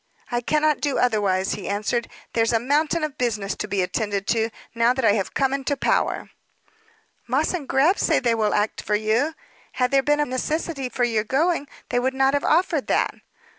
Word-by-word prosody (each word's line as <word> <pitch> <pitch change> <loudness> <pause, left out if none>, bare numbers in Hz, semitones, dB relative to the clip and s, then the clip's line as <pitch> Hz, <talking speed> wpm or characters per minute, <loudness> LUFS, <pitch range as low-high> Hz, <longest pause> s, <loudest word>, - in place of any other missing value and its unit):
"I 240 0 0
cannot 300 +3 +1
do 285 -2 0
otherwise," 200 -6 +1
he - - -4
answered. 215 +4 -1 0.2
"There's 225 0 +2
a 225 - +3
mountain 300 +6 +1
of 300 -3 -4
business 220 -5 -1
to - - -4
be 195 -2 0
attended 200 +1 -2
to, 225 -1 +1 0.2
now 235 +1 +3
that 260 -3 0
I - - +6
am 200 -2 +1
come 270 -1 +1
into 275 +1 -1
power." - - 0 1.0
"Moss 265 +9 +1
& 275 - -12
Grab 300 +10 +3
say - - +3
they 235 -2 +2
will 215 -2 +1
act 210 +1 0
for 210 - 0
you. 225 +9 +1 0.4
Had 250 -1 0
there 275 0 +4
been 295 +2 +1
a 295 - +2
necessity 275 +1 -2
for 245 - -2
your 225 -3 +1
going, 290 +5 0 0.2
they 245 - +1
would 260 +2 -1
not 270 0 +3
have 285 - +1
offered 325 -3 +2
that." - - +1
250 Hz, 200 wpm, -23 LUFS, 220-285 Hz, 1.0 s, I